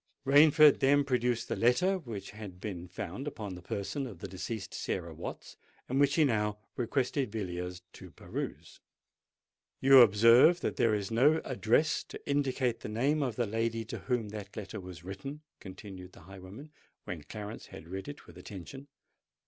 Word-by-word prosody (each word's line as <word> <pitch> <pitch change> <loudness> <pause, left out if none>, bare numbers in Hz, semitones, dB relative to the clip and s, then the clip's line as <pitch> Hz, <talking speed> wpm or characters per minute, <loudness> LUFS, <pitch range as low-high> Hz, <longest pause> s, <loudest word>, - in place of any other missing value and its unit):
Rainford 150 +1 +7
then 145 +1 +4
produced 125 -3 0
the - - -2
letter 180 +12 +3
which 110 - -7
had 105 -4 -9
been 90 -3 -6
found 125 - -6
about 105 -9 -5
the 90 - -9
person 105 - -4
of 105 -7 -10
the 85 - -7
deceased 95 +3 -6
Sarah - - -3
Watts, - - -8 0.3
and 130 +2 0
which 140 -1 +4
he 160 - +5
now 105 -4 0 0.2
requested 130 0 -1
Villiers 90 -4 -5
to - - -11
peruse. - - -7 1.0
"You 135 0 +8
observe 115 - +6
that - - -2
there 115 -2 +3
is 100 -1 -3
no 145 +8 +4
address 130 +4 +1
to - - -11
indicate 135 -4 0
the - - -7
name 135 +8 +1
of 125 -6 -1
the 120 - 0
lady 115 +1 -1
to 115 - -6
whom 120 -5 -2
that 100 -1 -8
letter 105 +1 -6
was 90 -3 -10
written," 100 +11 -7 0.2
continued 95 -1 -10
the - - -15
highwayman, 95 - -11 0.3
when 85 -3 -6
Clarence 105 +7 -8
had 80 - -11
read 95 +5 -6
it 145 0 -9
with 85 +1 -13
attention. 105 +10 -9
115 Hz, 170 wpm, -31 LUFS, 95-135 Hz, 1.0 s, You